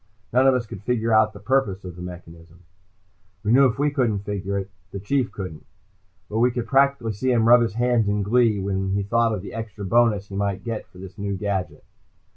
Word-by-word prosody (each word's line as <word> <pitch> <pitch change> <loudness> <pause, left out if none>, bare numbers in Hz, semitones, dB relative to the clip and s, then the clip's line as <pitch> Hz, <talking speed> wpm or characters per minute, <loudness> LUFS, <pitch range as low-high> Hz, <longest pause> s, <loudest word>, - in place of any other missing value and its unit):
None 130 +2 +5
of 135 - +5
us 125 -2 -1
could 100 -3 -9
figure 115 0 0
out 110 0 +4
the 100 - -12
purpose 105 -4 0
of 90 -2 -7
the 90 - -10
mechanism. 85 -1 -11 0.8
We 105 - 0
knew 135 +2 +6
if 125 0 -3
we 145 +1 +1
couldn't 115 -8 0
figure 100 -1 -3
it, 95 0 -5 0.2
the 100 - -6
Chief 125 +5 -1
couldn't. 90 -6 -7 0.6
But 110 - -2
we 125 +2 +4
could 120 -1 -3
practically 135 -5 +2
see 130 +6 -1
him 115 -2 +3
rub 120 +1 +7
his 115 -3 -1
hands 120 -2 +2
in 100 0 0
glee 115 +1 +3
when 95 0 -2
he 100 0 0
thought 115 +3 +1
of 105 -4 -3
the - - -8
extra 110 -3 -6
bonus 105 -1 +2
he 100 - -7
might 100 -1 -2
get 115 -2 -5
for - - -19
this 95 +3 -11
new 100 -1 -2
gadget. 95 -2 -3
105 Hz, 225 wpm, -23 LUFS, 95-120 Hz, 0.8 s, rub